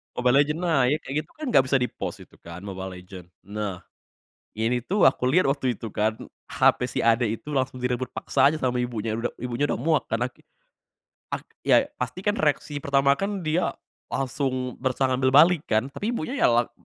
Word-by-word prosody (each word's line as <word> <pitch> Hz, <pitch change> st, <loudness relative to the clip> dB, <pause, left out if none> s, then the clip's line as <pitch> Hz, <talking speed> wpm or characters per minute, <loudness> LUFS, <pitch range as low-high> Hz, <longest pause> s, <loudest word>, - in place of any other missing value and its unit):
Mobile 125 Hz, +1 st, +2 dB
Legends 150 Hz, +4 st, -1 dB
naik. 145 Hz, -5 st, +3 dB
Kayak 135 Hz, -, -6 dB
gitu, -, -, -28 dB
kan, 310 Hz, 0 st, -6 dB
gak 135 Hz, -, +6 dB
bisa 135 Hz, -, +3 dB
di-pause 125 Hz, -, -4 dB
itu, -, -, -21 dB
kan, 85 Hz, +2 st, -10 dB
Mobile 95 Hz, -2 st, -6 dB
Legends. 90 Hz, -1 st, -11 dB, 0.2 s
Nah, 100 Hz, -3 st, -5 dB, 0.7 s
ini 115 Hz, +3 st, 0 dB
tuh, 200 Hz, +6 st, 0 dB
aku 130 Hz, -, -4 dB
liat 140 Hz, +4 st, +3 dB
waktu 135 Hz, -3 st, 0 dB
itu, 115 Hz, -, -6 dB
kan, 110 Hz, +2 st, 0 dB, 0.3 s
HP -, -, +3 dB
si -, -, -4 dB
adek 115 Hz, 0 st, +3 dB
itu -, -, -10 dB
langsung 130 Hz, -1 st, -2 dB
direbut 125 Hz, 0 st, -2 dB
paksa 140 Hz, -, +2 dB
aja -, -, -2 dB
sama 125 Hz, -1 st, 0 dB
ibunya 115 Hz, -3 st, -2 dB
uda 115 Hz, +1 st, -3 dB
ibunya 125 Hz, +3 st, -1 dB
udah -, -, 0 dB
muak 155 Hz, +2 st, +2 dB
karena 120 Hz, +3 st, -1 dB
ki -, -, -27 dB, 0.9 s
ak -, -, -8 dB, 0.2 s
ya, -, -, +7 dB, 0.2 s
pasti, 125 Hz, +7 st, -3 dB
kan, 205 Hz, +1 st, +1 dB
reaksi 145 Hz, -1 st, 0 dB
pertama, 140 Hz, 0 st, +3 dB
kan, 195 Hz, -1 st, -2 dB
dia 160 Hz, +3 st, 0 dB, 0.3 s
langsung 130 Hz, -1 st, -2 dB
berusaha 130 Hz, 0 st, 0 dB
ngambil 130 Hz, 0 st, +2 dB
balik, 165 Hz, +2 st, +6 dB
kan, 115 Hz, +6 st, +1 dB
tapi 225 Hz, -, -3 dB
ibunya, 240 Hz, -, -3 dB
ya, -, -, +5 dB
lag 120 Hz, 0 st, +2 dB
130 Hz, 190 wpm, -25 LUFS, 115-145 Hz, 0.9 s, ya